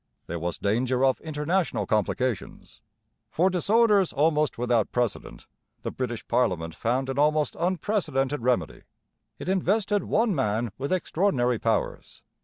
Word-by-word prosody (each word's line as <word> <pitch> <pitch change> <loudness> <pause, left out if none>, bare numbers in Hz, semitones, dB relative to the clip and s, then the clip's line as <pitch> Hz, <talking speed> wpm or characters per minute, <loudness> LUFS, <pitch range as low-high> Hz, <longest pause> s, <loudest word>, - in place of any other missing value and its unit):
There 85 - -5
was 85 +1 -3
danger 125 +5 +1
of 130 - +1
international 160 +4 -1
complications. 110 +2 -2 0.5
For 185 +4 +2
disorders 205 +1 +3
almost 150 +1 +1
without 120 -3 +1
precedent 115 - -3 0.4
the - - -3
British 120 -3 -4
parliament 90 -9 0
found 125 +8 -1
an 135 +1 -2
almost 150 -1 +2
unprecedented 165 - 0
remedy. 120 -9 0 0.6
It - - -8
invested 200 +2 +1
one 225 -1 +2
man 115 - -1
with 140 +1 -3
extraordinary 150 - +1
powers. 115 -1 -2
135 Hz, 125 wpm, -26 LUFS, 120-180 Hz, 0.6 s, disorders